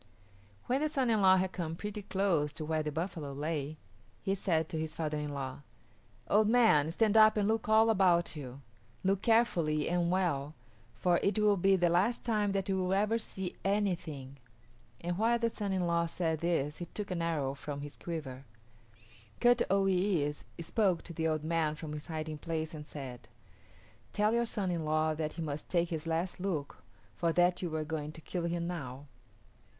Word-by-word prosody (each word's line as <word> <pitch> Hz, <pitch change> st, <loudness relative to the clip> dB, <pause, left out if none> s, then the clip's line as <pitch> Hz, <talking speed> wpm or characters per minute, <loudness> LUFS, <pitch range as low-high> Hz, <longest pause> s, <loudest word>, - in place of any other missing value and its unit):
When 260 Hz, +3 st, +1 dB
the 305 Hz, -, +1 dB
son 265 Hz, -5 st, +1 dB
in 215 Hz, -2 st, +2 dB
law 190 Hz, -1 st, +7 dB
had 185 Hz, 0 st, 0 dB
come 165 Hz, -3 st, -4 dB
pretty 210 Hz, +3 st, -5 dB
close 190 Hz, -7 st, +1 dB
to 155 Hz, -1 st, -5 dB
where 155 Hz, 0 st, 0 dB
the 150 Hz, 0 st, -3 dB
buffalo 160 Hz, -3 st, -4 dB
lay 150 Hz, +1 st, -3 dB, 0.5 s
he 195 Hz, -, +1 dB
said 165 Hz, -5 st, 0 dB
to 160 Hz, -4 st, -3 dB
his 155 Hz, 0 st, -4 dB
father 155 Hz, -2 st, -2 dB
in 150 Hz, 0 st, -3 dB
law, 135 Hz, -2 st, -5 dB, 0.7 s
"Old 210 Hz, +1 st, +4 dB
man, 220 Hz, -11 st, +5 dB
stand 215 Hz, +4 st, +2 dB
up 215 Hz, 0 st, +7 dB
and 205 Hz, -1 st, +2 dB
look 220 Hz, 0 st, 0 dB
all 220 Hz, +1 st, +6 dB
about 185 Hz, -6 st, +3 dB
you. 135 Hz, -2 st, -8 dB, 0.4 s
Look 190 Hz, 0 st, +2 dB
carefully 170 Hz, -10 st, +2 dB
and 175 Hz, 0 st, +1 dB
well, 160 Hz, -6 st, 0 dB, 0.4 s
for 175 Hz, -1 st, +2 dB
it 200 Hz, +2 st, +1 dB
will 210 Hz, -1 st, +4 dB
be 195 Hz, +1 st, +4 dB
the 175 Hz, -2 st, +2 dB
last 200 Hz, +8 st, +2 dB
time 210 Hz, -3 st, +1 dB
that 195 Hz, -1 st, -1 dB
you 190 Hz, -1 st, +1 dB
will 185 Hz, 0 st, 0 dB
ever 215 Hz, +3 st, +2 dB
see 190 Hz, -4 st, -5 dB
anything"; 170 Hz, -9 st, -1 dB, 0.6 s
and 175 Hz, +2 st, -2 dB
while 230 Hz, +2 st, +3 dB
the 230 Hz, 0 st, 0 dB
son 205 Hz, -3 st, -3 dB
in 185 Hz, -2 st, 0 dB
law 170 Hz, 0 st, +1 dB
said 165 Hz, -2 st, -1 dB
this 155 Hz, -4 st, 0 dB
he 175 Hz, -, -5 dB
took 205 Hz, +2 st, -6 dB
an 175 Hz, -2 st, -1 dB
arrow 150 Hz, -5 st, 0 dB
from 140 Hz, 0 st, -6 dB
his 145 Hz, 0 st, -8 dB
quiver. 140 Hz, -6 st, -6 dB, 1.0 s
Kut 245 Hz, 0 st, +5 dB
o 195 Hz, +1 st, +3 dB
yis´ 180 Hz, -6 st, +1 dB
spoke 185 Hz, +1 st, +1 dB
to 170 Hz, -, -8 dB
the 160 Hz, 0 st, -1 dB
old 155 Hz, -1 st, -1 dB
man 160 Hz, -1 st, 0 dB
from 155 Hz, -1 st, -7 dB
his 150 Hz, 0 st, -7 dB
hiding 155 Hz, -2 st, -4 dB
place 160 Hz, 0 st, -3 dB
and 150 Hz, -1 st, -8 dB
said, 130 Hz, -5 st, -8 dB, 0.9 s
"Tell 210 Hz, +1 st, +2 dB
your 235 Hz, 0 st, +2 dB
son 195 Hz, -4 st, -1 dB
in 170 Hz, -2 st, -2 dB
law 155 Hz, 0 st, +1 dB
that 155 Hz, 0 st, -3 dB
he 165 Hz, -, -4 dB
must 150 Hz, -1 st, -5 dB
take 170 Hz, -1 st, +1 dB
his 160 Hz, -1 st, -4 dB
last 165 Hz, +3 st, -1 dB
look, 170 Hz, -7 st, -3 dB, 0.4 s
for 170 Hz, -1 st, +1 dB
that 180 Hz, +1 st, +3 dB
you 170 Hz, -3 st, -3 dB
are 155 Hz, -1 st, -1 dB
going 150 Hz, -1 st, -4 dB
to 160 Hz, -, -11 dB
kill 175 Hz, +2 st, -3 dB
him 170 Hz, 0 st, -1 dB
now." 145 Hz, -6 st, -5 dB
170 Hz, 195 wpm, -32 LUFS, 155-195 Hz, 1.0 s, law